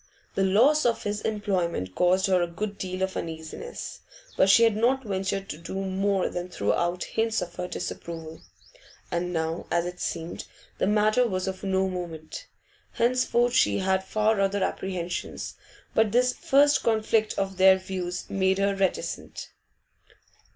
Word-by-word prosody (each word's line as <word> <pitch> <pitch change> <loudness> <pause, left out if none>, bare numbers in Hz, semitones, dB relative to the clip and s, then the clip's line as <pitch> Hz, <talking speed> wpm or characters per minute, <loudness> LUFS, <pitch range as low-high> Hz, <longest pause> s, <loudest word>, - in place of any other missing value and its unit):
The 195 - +1
loss 245 +11 +4
of 235 -1 +1
his 205 0 -2
employment 180 - -1
caused 180 - +3
her 185 -2 +3
a 175 - +1
good 200 +4 -5
deal 185 0 -3
of 190 0 -2
uneasiness, 160 - -6 0.4
but 190 - +4
she 230 +4 +7
had 225 -2 +4
not 255 +5 +2
ventured 195 -1 -2
to 150 - -6
do 170 +3 -7
more 195 0 0
than 175 +1 -5
throw 105 - 0
out 175 +1 0
hints 225 0 0
of - - -5
her 180 - -3
disapproval; 165 -3 -6 0.7
and 175 +1 -1
now, 160 0 -2
as 170 0 +1
it 180 0 -6
seemed, 165 0 -4 0.3
the - - +2
matter 215 +4 +3
was 185 -3 -2
of 190 -1 -4
no 190 -1 +1
moment. 170 -4 -6 0.5
Henceforth 245 0 +2
she 260 - +3
had 190 0 +1
far 215 +1 +1
other 195 0 +1
apprehensions, 180 -2 -3 0.4
but 220 -2 +3
this 250 +2 +3
first 285 +2 +3
conflict 220 -1 +1
of 195 -1 -2
their 190 0 +7
views 185 -1 -4
made 190 -1 +1
her 200 0 +2
reticent. 195 -2 -2
190 Hz, 160 wpm, -26 LUFS, 180-215 Hz, 0.7 s, she